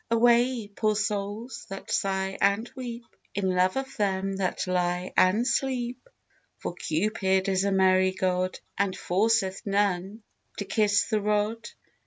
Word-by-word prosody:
Away, 235 Hz, 0 st, +3 dB
poor 215 Hz, +1 st, 0 dB
souls, 210 Hz, +3 st, -3 dB
that 195 Hz, 0 st, -7 dB
sigh 190 Hz, 0 st, 0 dB
and 200 Hz, +4 st, +2 dB
weep, 240 Hz, -2 st, -6 dB, 0.3 s
In 190 Hz, -2 st, 0 dB
love 185 Hz, +5 st, +2 dB
of 270 Hz, 0 st, -4 dB
them 195 Hz, -2 st, 0 dB
that 190 Hz, -2 st, -1 dB
lie 180 Hz, 0 st, -1 dB
and 200 Hz, +6 st, +4 dB
sleep! 255 Hz, -, -1 dB, 0.5 s
For -, -, -5 dB
Cupid 190 Hz, +3 st, 0 dB
is 190 Hz, 0 st, +1 dB
a 200 Hz, -, +1 dB
merry 185 Hz, -1 st, +4 dB
god, 185 Hz, 0 st, -1 dB, 0.2 s
And 200 Hz, -2 st, 0 dB
forceth 195 Hz, 0 st, +1 dB
none 200 Hz, +1 st, 0 dB, 0.3 s
to 200 Hz, -, -3 dB
kiss 205 Hz, -2 st, +2 dB
the 215 Hz, -2 st, 0 dB
rod. 210 Hz, +2 st, 0 dB
200 Hz, 140 wpm, -27 LUFS, 190-225 Hz, 0.5 s, and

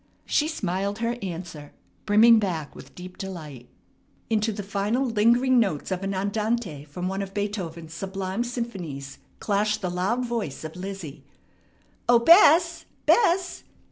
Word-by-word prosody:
She 300 Hz, -, +1 dB
smiled 200 Hz, -, -2 dB
her 230 Hz, +1 st, -1 dB
answer, 170 Hz, -5 st, -7 dB, 0.3 s
brimming 220 Hz, +2 st, +7 dB
back 170 Hz, -8 st, -3 dB
with 135 Hz, -, -13 dB
deep 180 Hz, +1 st, -10 dB
delight. 155 Hz, -10 st, -8 dB, 0.6 s
Into 220 Hz, 0 st, +1 dB
the 205 Hz, -1 st, -5 dB
final 205 Hz, +6 st, -1 dB
lingering 240 Hz, +3 st, +3 dB
notes 190 Hz, -7 st, -1 dB
of 185 Hz, 0 st, -2 dB
an 195 Hz, 0 st, -2 dB
andante 200 Hz, -5 st, -2 dB
from 175 Hz, +5 st, -5 dB
one 195 Hz, +1 st, -2 dB
of 195 Hz, 0 st, -7 dB
Beethoven's 175 Hz, -6 st, -4 dB
sublime 195 Hz, +4 st, -3 dB
symphonies 185 Hz, -, -6 dB, 0.2 s
clashed 210 Hz, +1 st, 0 dB
the 180 Hz, -, -1 dB
loud 195 Hz, +8 st, -1 dB
voice 230 Hz, -, -4 dB
of 155 Hz, +1 st, -7 dB
Lizzie: 185 Hz, -5 st, -7 dB, 0.9 s
"O 245 Hz, -, +7 dB
Bess! 335 Hz, -, +6 dB, 0.2 s
Bess! 370 Hz, -5 st, +2 dB
200 Hz, 140 wpm, -25 LUFS, 180-235 Hz, 0.9 s, brimming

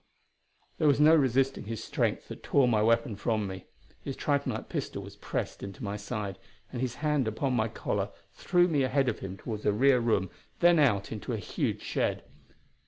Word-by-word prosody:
There 155 Hz, -, +3 dB
was 145 Hz, -1 st, +4 dB
no 155 Hz, +2 st, +7 dB
resisting 135 Hz, -4 st, +2 dB
his 115 Hz, 0 st, -5 dB
strength -, -, -1 dB
that -, -, -8 dB
tore 140 Hz, -3 st, +3 dB
my 110 Hz, -3 st, +3 dB
weapon 115 Hz, 0 st, +2 dB
from 110 Hz, +1 st, -1 dB
me. 95 Hz, -1 st, -7 dB, 0.4 s
His 135 Hz, -, -5 dB
tritonite 140 Hz, -1 st, -1 dB
pistol -, -, -4 dB
was -, -, -11 dB
pressed -, -, -4 dB
into 100 Hz, +7 st, -7 dB
my 100 Hz, 0 st, -3 dB
side, 105 Hz, -2 st, -4 dB, 0.3 s
and 125 Hz, -, -4 dB
his 125 Hz, -2 st, -2 dB
hand 150 Hz, -5 st, +2 dB
upon 125 Hz, +5 st, -1 dB
my 115 Hz, -3 st, +2 dB
collar 110 Hz, -, -2 dB, 0.2 s
threw 175 Hz, 0 st, +3 dB
me 150 Hz, -5 st, +1 dB
ahead 135 Hz, +1 st, +2 dB
of 110 Hz, -, -3 dB
him 95 Hz, 0 st, -6 dB
toward 105 Hz, -1 st, -6 dB
a 105 Hz, -, +3 dB
rear 130 Hz, +5 st, +4 dB
room, 105 Hz, -6 st, +1 dB, 0.3 s
then 175 Hz, -1 st, +5 dB
out 110 Hz, -9 st, +2 dB
into 110 Hz, -3 st, -4 dB
a -, -, -1 dB
huge -, -, -2 dB
shed. -, -, -1 dB
120 Hz, 190 wpm, -29 LUFS, 105-140 Hz, 0.4 s, no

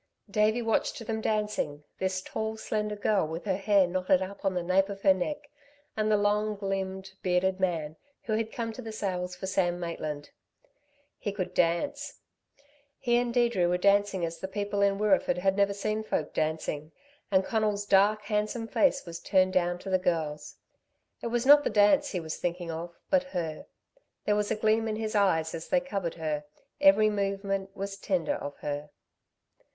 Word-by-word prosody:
Davey 215 Hz, +3 st, +2 dB
watched 225 Hz, -1 st, 0 dB
them 220 Hz, 0 st, -2 dB
dancing, 210 Hz, -10 st, -1 dB, 0.2 s
this 190 Hz, 0 st, -1 dB
tall 220 Hz, +2 st, -3 dB
slender 210 Hz, -1 st, -2 dB
girl 205 Hz, -4 st, +1 dB
with 165 Hz, +4 st, -6 dB
her 190 Hz, -3 st, +1 dB
hair 200 Hz, 0 st, +4 dB
knotted 185 Hz, +1 st, +2 dB
up 190 Hz, +2 st, -6 dB
on 190 Hz, -2 st, 0 dB
the 180 Hz, -, -1 dB
nape 190 Hz, +3 st, +2 dB
of 195 Hz, -1 st, -7 dB
her 195 Hz, -, +7 dB
neck 290 Hz, +11 st, -4 dB, 0.5 s
and 215 Hz, 0 st, 0 dB
the 210 Hz, -, +4 dB
long 210 Hz, +1 st, +1 dB
limbed, 190 Hz, -1 st, -3 dB
bearded 185 Hz, +1 st, +1 dB
man 165 Hz, -5 st, -1 dB, 0.3 s
who 220 Hz, -, -2 dB
had 220 Hz, 0 st, -1 dB
come 230 Hz, -1 st, -3 dB
to 250 Hz, -, -8 dB
the 225 Hz, -2 st, -6 dB
sales 180 Hz, -4 st, -3 dB
for 180 Hz, -, -6 dB
Sam 180 Hz, -2 st, 0 dB
Maitland. 155 Hz, -4 st, -5 dB, 0.9 s
He 205 Hz, -, -2 dB
could 195 Hz, -3 st, -4 dB
dance. 285 Hz, +13 st, 0 dB, 0.8 s
He 240 Hz, -2 st, +1 dB
and 245 Hz, 0 st, 0 dB
Deirdre 235 Hz, -7 st, +2 dB
were 180 Hz, +1 st, +2 dB
dancing 200 Hz, -1 st, +3 dB
as 165 Hz, 0 st, -6 dB
the 190 Hz, -, -4 dB
people 200 Hz, +1 st, -2 dB
in 200 Hz, 0 st, +3 dB
Wirreeford 205 Hz, -3 st, +2 dB
had 190 Hz, +1 st, +1 dB
never 200 Hz, 0 st, +3 dB
seen 215 Hz, +2 st, -2 dB
folk 155 Hz, -7 st, -2 dB
dancing, 155 Hz, -1 st, -2 dB, 0.4 s
and 190 Hz, -2 st, +3 dB
Conal's 210 Hz, -2 st, 0 dB
dark, 205 Hz, +2 st, +4 dB
handsome 210 Hz, +2 st, -1 dB
face 275 Hz, +3 st, +2 dB
was 170 Hz, -1 st, -7 dB
turned 185 Hz, -1 st, +2 dB
down 175 Hz, -1 st, +1 dB
to 190 Hz, +2 st, -7 dB
the 185 Hz, -, +3 dB
girl's. 155 Hz, -5 st, -2 dB, 0.7 s
It -, -, -3 dB
was 240 Hz, +1 st, -1 dB
not 290 Hz, +1 st, +8 dB
the -, -, +1 dB
dance 220 Hz, +8 st, +4 dB
he 185 Hz, -, -2 dB
was 160 Hz, -2 st, -5 dB
thinking 175 Hz, -1 st, -3 dB
of, 170 Hz, +1 st, -6 dB
but 280 Hz, -2 st, +5 dB, 0.2 s
her. 160 Hz, -3 st, -4 dB, 0.6 s
There 210 Hz, -, +3 dB
was 210 Hz, 0 st, 0 dB
a -, -, +1 dB
gleam 220 Hz, +1 st, +2 dB
in 215 Hz, -, -1 dB
his 220 Hz, 0 st, -3 dB
eyes 165 Hz, -6 st, +2 dB
as 165 Hz, -1 st, -6 dB
they 275 Hz, -, +4 dB
covered 200 Hz, -10 st, -3 dB
her; 155 Hz, -2 st, -3 dB, 0.3 s
every 290 Hz, -8 st, +6 dB
movement 195 Hz, -1 st, -2 dB
was 195 Hz, 0 st, -4 dB
tender 185 Hz, -7 st, 0 dB
of 145 Hz, 0 st, -6 dB
her. 145 Hz, 0 st, -4 dB
195 Hz, 185 wpm, -29 LUFS, 180-215 Hz, 0.9 s, not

